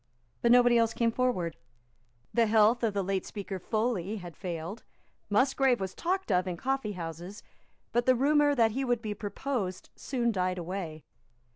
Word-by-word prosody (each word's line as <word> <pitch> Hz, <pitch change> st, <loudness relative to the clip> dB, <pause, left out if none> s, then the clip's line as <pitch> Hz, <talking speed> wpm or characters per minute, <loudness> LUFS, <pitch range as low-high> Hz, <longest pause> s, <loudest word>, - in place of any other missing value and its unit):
But 235 Hz, -, +3 dB
nobody 245 Hz, -1 st, +6 dB
else 230 Hz, -1 st, +1 dB
came 230 Hz, -1 st, +2 dB
forward. 225 Hz, -10 st, -1 dB, 0.8 s
The 230 Hz, -1 st, +3 dB
health 220 Hz, +2 st, +4 dB
of 220 Hz, -4 st, 0 dB
the 200 Hz, -, +1 dB
late 190 Hz, 0 st, -1 dB
Speaker 195 Hz, -2 st, -6 dB
Foley 215 Hz, -1 st, -1 dB
had 175 Hz, -5 st, -9 dB
failed. 175 Hz, +4 st, -5 dB, 0.5 s
Musgrave 260 Hz, +3 st, +3 dB
was 190 Hz, -1 st, -4 dB
talked 370 Hz, -, -2 dB
of 180 Hz, 0 st, +2 dB
in 175 Hz, -2 st, -3 dB
coffeehouses; 195 Hz, -, -4 dB, 0.5 s
but 240 Hz, +1 st, +1 dB
the 255 Hz, -, +6 dB
rumour 290 Hz, +2 st, +3 dB
that 225 Hz, -3 st, +4 dB
he 265 Hz, +5 st, -2 dB
would 245 Hz, -2 st, 0 dB
be 210 Hz, -1 st, -2 dB
proposed 205 Hz, -2 st, -4 dB
soon 240 Hz, -3 st, -1 dB
died 185 Hz, -2 st, -1 dB
away. 170 Hz, -3 st, -5 dB
215 Hz, 160 wpm, -29 LUFS, 185-245 Hz, 0.8 s, nobody